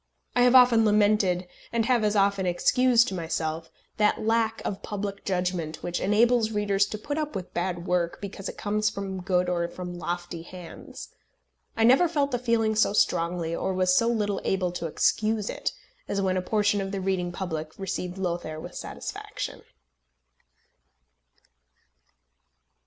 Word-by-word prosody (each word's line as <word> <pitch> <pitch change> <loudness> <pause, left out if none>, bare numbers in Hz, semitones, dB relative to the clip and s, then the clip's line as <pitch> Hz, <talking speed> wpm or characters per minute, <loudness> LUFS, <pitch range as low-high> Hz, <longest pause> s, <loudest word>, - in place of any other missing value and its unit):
I 245 - +4
have 245 +1 +5
often 245 -3 +7
lamented, 205 -4 +3 0.3
and 230 -1 +1
have 240 -2 +2
as 210 0 +1
often 200 -1 +2
excused 240 +7 +4
to - - -6
myself, 160 -2 -3 0.3
that 210 -1 +3
lack 225 0 +1
of 195 - -3
public 200 -1 -5
judgment 180 -4 -2
which 175 0 -2
enables 225 +3 +3
readers 205 -2 +1
to 215 - -5
put 290 +8 -3
up 300 -6 -3
with 185 -2 -6
bad 175 -1 -2
work 175 -2 0
because 195 -1 -6
it - - -9
comes 215 0 0
from 195 -2 -5
good 180 -1 +1
or 170 -1 0
from 175 0 -7
lofty 175 0 -4
hands. 175 0 -10 0.7
I 225 - +3
never 260 +9 +6
felt 290 -4 0
the 245 - 0
feeling 230 -2 +1
so 215 -1 +3
strongly, 170 -4 +1
or 190 - -2
was 185 0 +3
so 230 - +3
little 210 -4 0
able 185 -2 0
to 175 -1 -4
excuse 215 +6 +1
it, - - -2 0.4
as 200 - -1
when 190 -1 +1
a 185 - +1
portion 205 +1 +1
of 195 0 -4
the 200 - -3
reading 185 -2 -1
public 160 -4 -5
received 185 -1 -4
Lothair 170 -4 -3
with - - -8
satisfaction. - - -6
195 Hz, 160 wpm, -26 LUFS, 180-220 Hz, 0.7 s, often